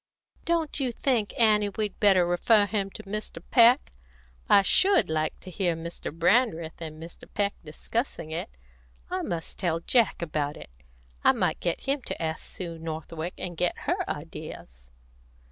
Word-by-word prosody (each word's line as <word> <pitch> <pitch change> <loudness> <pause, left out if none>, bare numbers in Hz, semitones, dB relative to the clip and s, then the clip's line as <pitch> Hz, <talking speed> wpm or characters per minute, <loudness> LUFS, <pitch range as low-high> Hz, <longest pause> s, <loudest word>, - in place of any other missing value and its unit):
"Don't 330 -3 0
you 260 -3 0
think, 235 -3 0
Annie, 210 -2 +4
we'd 210 0 -3
better 190 -4 +5
refer 205 +5 +4
him 200 -1 -1
to 215 - -10
Mr. 210 -3 -5
Peck? 240 +3 +6 0.6
I 200 - +7
should 380 - +4
like 155 0 -1
to 185 - -10
hear 175 -2 0
Mr. 170 +1 -6
Brandreth 170 -1 +1
and 155 -1 -6
Mr. 165 +1 -11
Peek 200 -1 0
discussing 160 - -4
it. 160 - -3 0.6
I - - -1
must 165 -2 -5
tell 170 -4 0
Jack 225 +1 +2
about 150 -3 -2
it. - - -12 0.5
I - - +6
might - - 0
get 170 - -1
him 275 +1 0
to - - -4
ask 160 -1 -2
Sue 170 -3 -7
Northwick, 160 +1 -5
and 175 -1 -5
get 175 +1 0
her - - -1
ideas." 60 +1 -8
180 Hz, 160 wpm, -27 LUFS, 165-215 Hz, 0.6 s, I